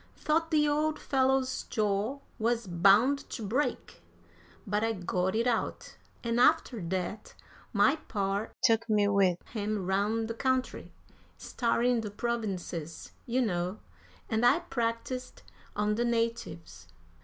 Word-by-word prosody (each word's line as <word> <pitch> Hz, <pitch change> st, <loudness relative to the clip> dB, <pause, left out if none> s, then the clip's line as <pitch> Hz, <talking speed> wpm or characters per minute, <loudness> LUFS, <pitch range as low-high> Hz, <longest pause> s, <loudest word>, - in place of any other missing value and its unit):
Thought 325 Hz, +2 st, +1 dB
the 300 Hz, -2 st, +3 dB
old 305 Hz, +1 st, +1 dB
fellow's 265 Hz, -1 st, +1 dB
jaw 215 Hz, +5 st, -1 dB, 0.2 s
was 230 Hz, +1 st, 0 dB
bound 200 Hz, +10 st, +4 dB
to 230 Hz, -, -5 dB
break! 255 Hz, +9 st, -2 dB, 0.6 s
But 210 Hz, 0 st, 0 dB
I 225 Hz, 0 st, +1 dB
got 185 Hz, 0 st, -1 dB
it 230 Hz, +2 st, +1 dB
out, 240 Hz, -2 st, -2 dB, 0.3 s
and 235 Hz, 0 st, 0 dB
after 255 Hz, -4 st, +3 dB
that 185 Hz, +4 st, -4 dB, 0.4 s
my 225 Hz, +8 st, +4 dB
par 200 Hz, 0 st, -1 dB
took 225 Hz, 0 st, +3 dB
me 210 Hz, -1 st, +3 dB
with 195 Hz, -3 st, +3 dB
him 210 Hz, -3 st, -2 dB
round 205 Hz, +4 st, 0 dB
the 230 Hz, -, -3 dB
country 260 Hz, +2 st, -1 dB, 0.5 s
starring 240 Hz, 0 st, +1 dB
the 215 Hz, -, -5 dB
provinces, 200 Hz, -7 st, -4 dB, 0.2 s
you 250 Hz, +2 st, +1 dB
know 180 Hz, -2 st, -1 dB, 0.5 s
and 220 Hz, 0 st, 0 dB
I 245 Hz, -, +5 dB
practised 235 Hz, +1 st, -3 dB, 0.3 s
on 210 Hz, 0 st, +1 dB
the 235 Hz, +3 st, 0 dB
natives." 230 Hz, -, -3 dB
225 Hz, 130 wpm, -30 LUFS, 200-245 Hz, 0.6 s, I